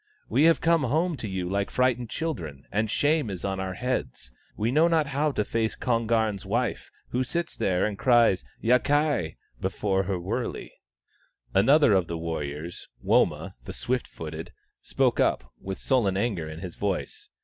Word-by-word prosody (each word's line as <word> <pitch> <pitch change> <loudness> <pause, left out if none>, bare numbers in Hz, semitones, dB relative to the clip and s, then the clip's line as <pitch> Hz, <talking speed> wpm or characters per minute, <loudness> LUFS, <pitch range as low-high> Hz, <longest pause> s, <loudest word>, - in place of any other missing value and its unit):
We 145 - +3
have 165 0 +5
come 165 0 +3
home 160 +7 +1
to 110 - -5
you 95 -2 -3
like 100 +2 -1
frightened 125 -2 +1
children, 80 - -4
and 110 +1 0
shame 145 0 +2
is 95 -2 -4
on 95 -1 -2
our 95 -1 -3
heads. 70 - -3 0.3
We 110 +3 0
know 155 +5 +5
not 165 -3 +3
how 145 +2 0
to 105 - 0
face 115 -1 -1
Kon 115 -3 0
garn's 110 -4 +1
wife, 115 +5 -1 0.2
who 125 +1 0
sits 170 +6 -3
there 90 -2 +1
and 105 -2 -3
cries 120 -7 +4
' - - -29
Yakai! 130 - +2
' - - -32
before 95 -2 0
her 95 0 -1
wurley." 110 +8 -3 0.8
Another 130 +5 +5
of 95 -3 +2
the 85 - -3
warriors, 80 0 -5 0.2
Woma - - +2
the - - -6
Swift 125 0 -2
footed, 80 +2 -7 0.3
spoke - - +1
up, 60 0 +1
with 95 0 -5
sullen 110 -8 +1
anger 100 -7 -1
in 80 +1 -8
his 90 -2 -6
voice. 100 -2 -3
110 Hz, 175 wpm, -27 LUFS, 90-130 Hz, 0.8 s, have